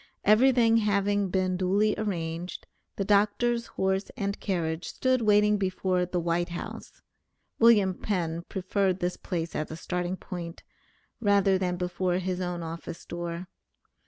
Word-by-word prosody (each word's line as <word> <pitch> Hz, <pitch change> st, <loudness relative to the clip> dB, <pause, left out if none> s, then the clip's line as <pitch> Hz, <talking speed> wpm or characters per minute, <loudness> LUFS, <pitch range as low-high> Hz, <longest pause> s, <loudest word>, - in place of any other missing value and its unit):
Everything 230 Hz, +1 st, +5 dB
having 205 Hz, -2 st, +1 dB
been 185 Hz, 0 st, 0 dB
duly 200 Hz, +3 st, +2 dB
arranged, 175 Hz, -4 st, -4 dB, 0.3 s
the 195 Hz, -, -2 dB
doctor's 215 Hz, +4 st, +2 dB
horse 190 Hz, +1 st, -1 dB
and 200 Hz, 0 st, -2 dB
carriage 165 Hz, -4 st, -2 dB
stood 260 Hz, -1 st, +1 dB
waiting 210 Hz, -1 st, +4 dB
before 185 Hz, -2 st, 0 dB
the 180 Hz, 0 st, -1 dB
White 170 Hz, +1 st, 0 dB
House 175 Hz, -, -8 dB, 0.6 s
(William 210 Hz, -5 st, +5 dB
Penn 170 Hz, -4 st, -2 dB
preferred 190 Hz, 0 st, 0 dB
this 180 Hz, 0 st, -1 dB
place 170 Hz, -3 st, -4 dB
as 155 Hz, -, -2 dB
a 160 Hz, -, -6 dB
starting 180 Hz, +1 st, -3 dB
point, 170 Hz, -2 st, -7 dB, 0.6 s
rather 200 Hz, -3 st, +3 dB
than 180 Hz, -1 st, -1 dB
before 180 Hz, 0 st, -1 dB
his 185 Hz, 0 st, -2 dB
own 175 Hz, -1 st, -3 dB
office 165 Hz, +1 st, -7 dB
door). 170 Hz, +1 st, -5 dB
185 Hz, 135 wpm, -28 LUFS, 175-205 Hz, 0.6 s, Everything